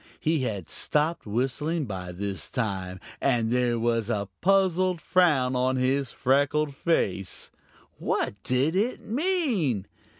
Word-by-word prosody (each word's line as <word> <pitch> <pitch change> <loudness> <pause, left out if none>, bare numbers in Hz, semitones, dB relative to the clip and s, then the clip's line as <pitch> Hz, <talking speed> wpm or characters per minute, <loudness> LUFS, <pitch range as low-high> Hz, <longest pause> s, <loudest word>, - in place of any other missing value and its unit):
He 160 0 +1
had 105 - -3
stopped 150 -2 -1
whistling 135 +8 -1
by 95 -5 -5
this 100 +2 -4
time, 95 -6 -3 0.2
and 120 -4 +2
there 125 -1 +2
was 115 -1 0
a 100 -4 -1
puzzled 185 -1 +3
frown 150 -9 +3
on 130 +1 +1
his 130 0 +1
freckled 145 +3 +1
face. 100 - -1 0.5
What - - 0
did 130 - +1
it 220 +6 0
mean? 235 - 0
130 Hz, 125 wpm, -27 LUFS, 110-165 Hz, 0.5 s, puzzled